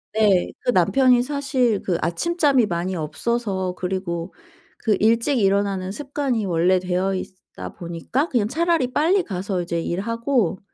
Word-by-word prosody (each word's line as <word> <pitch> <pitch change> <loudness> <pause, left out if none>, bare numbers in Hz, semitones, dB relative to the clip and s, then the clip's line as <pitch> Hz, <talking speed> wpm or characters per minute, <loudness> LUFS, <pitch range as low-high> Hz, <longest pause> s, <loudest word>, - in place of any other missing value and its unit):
네. 210 -4 +3
그 - - 0
남편이 245 +6 +4
사실 265 -5 0
그 175 -3 -1
아침잠이 285 - +2
많이 180 0 -2
없어서 190 +3 -2
그리고 180 -2 -3 0.4
그 215 -4 +1
일찍 230 +5 +2
일어나는 195 -2 +1
습관이 275 -4 -2
원래 180 +1 +2
되어 185 +1 -1
있다 185 0 -8
보니까 175 - -2
그냥 235 -9 0
차라리 330 -4 +1
빨리 350 +8 +2
가서 190 - -3
이제 170 -1 -2
일하고 230 +2 -1
205 Hz, 295 characters per minute, -22 LUFS, 185-255 Hz, 0.4 s, 남편이